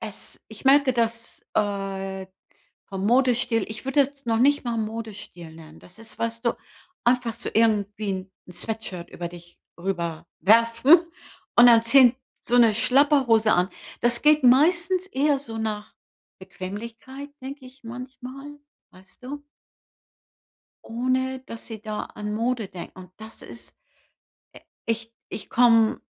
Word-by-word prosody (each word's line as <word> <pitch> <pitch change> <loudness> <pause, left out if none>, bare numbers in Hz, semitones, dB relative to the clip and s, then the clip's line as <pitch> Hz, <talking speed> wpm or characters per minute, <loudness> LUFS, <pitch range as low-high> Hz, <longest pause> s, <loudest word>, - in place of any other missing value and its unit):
es 215 -3 -7
ich 220 +2 -13
merke, 275 -1 +5
dass, 230 -1 -2
äh, 195 -2 -2 0.6
vom 195 0 -4
Modestil 245 -2 +2
ich 220 +3 -8
würde 275 +1 +4
das 280 -2 -18
noch 225 -1 +1
nicht 285 +4 +3
mal 235 -1 -2
Modestil 210 -7 -6
nennen. 160 -1 -14
Das 180 +5 -16
ist, 225 0 -8
weißt 230 +1 -3
du, 235 - +2 0.5
einfach 240 -1 +1
so 235 - -5
irgendwie 205 -3 0 0.2
'n - - -10
Sweatshirt 185 -2 -4
über 170 0 -6
dich 175 0 -14 0.2
rüberwerfen 205 - +3 0.6
und 240 0 +9
dann 230 -1 +7
ziehen 250 0 +6 0.3
so 245 +1 +1
'ne 230 -3 +6
Schlabberhose 255 -3 +4
an. 180 +2 +2 0.3
Das 240 0 +2
geht 300 -1 +4
meistens 345 +8 +4
eher 285 -2 +1
so 225 -5 -8
nach 215 -1 -4 0.5
Bequemlichkeit, 225 +9 -8
denke 270 +1 -8
ich 260 +1 -18
manchmal, 255 +4 -9 0.3
weißt 190 +7 -18
du? 285 +2 -7 1.4
Ohne 255 +2 -1
dass 230 -3 -10
sie 220 -2 -8
da 215 -1 -4
an 210 0 -6
Mode 230 -1 -1
denken. 180 0 -10
Und 180 0 -13
das 220 +1 -12
ist - - -13 0.8
äh, - - -14 0.3
ich 230 0 -3 0.2
ich 205 - -7
komme 230 -2 +4
230 Hz, 140 wpm, -24 LUFS, 205-255 Hz, 1.4 s, und